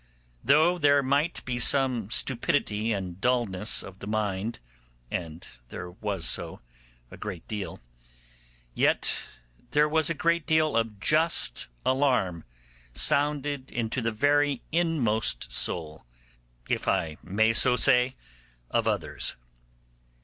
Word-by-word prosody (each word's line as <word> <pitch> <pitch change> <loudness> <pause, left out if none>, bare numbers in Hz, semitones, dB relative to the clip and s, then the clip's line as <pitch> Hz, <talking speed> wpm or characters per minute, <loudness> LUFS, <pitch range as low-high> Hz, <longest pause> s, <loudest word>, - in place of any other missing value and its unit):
Though 160 +7 +4
there 145 -2 +4
might 140 +5 0
be 125 -1 -3
some 125 -5 +3
stupidity 115 -3 0
and 95 -3 -4
dulness 115 -5 0
of 95 0 -12
the 100 - -8
mind 105 0 -2 0.5
(and 85 -1 -5 0.2
there 90 0 -7
was 100 -2 -2
so, - - -1 0.5
a - - -11
great 85 -3 -7
deal), 105 -3 -5 0.9
yet - - +2 0.6
there 150 +1 +3
was 160 0 +2
a 165 - -1
great 170 +1 0
deal 155 -1 +2
of 115 -3 -1
just 155 - +2 0.2
alarm 125 - +1 0.5
sounded 145 - +2
into 115 +1 -2
the 115 0 -1
very 145 +3 +1
inmost 130 - 0
soul, 75 +4 -1 0.6
if - - -2
I 80 -2 0
may 110 +5 +1
so 125 +2 +4
say, 125 0 +3 0.6
of - - +1
others. - - -1
120 Hz, 120 wpm, -27 LUFS, 100-145 Hz, 0.9 s, Though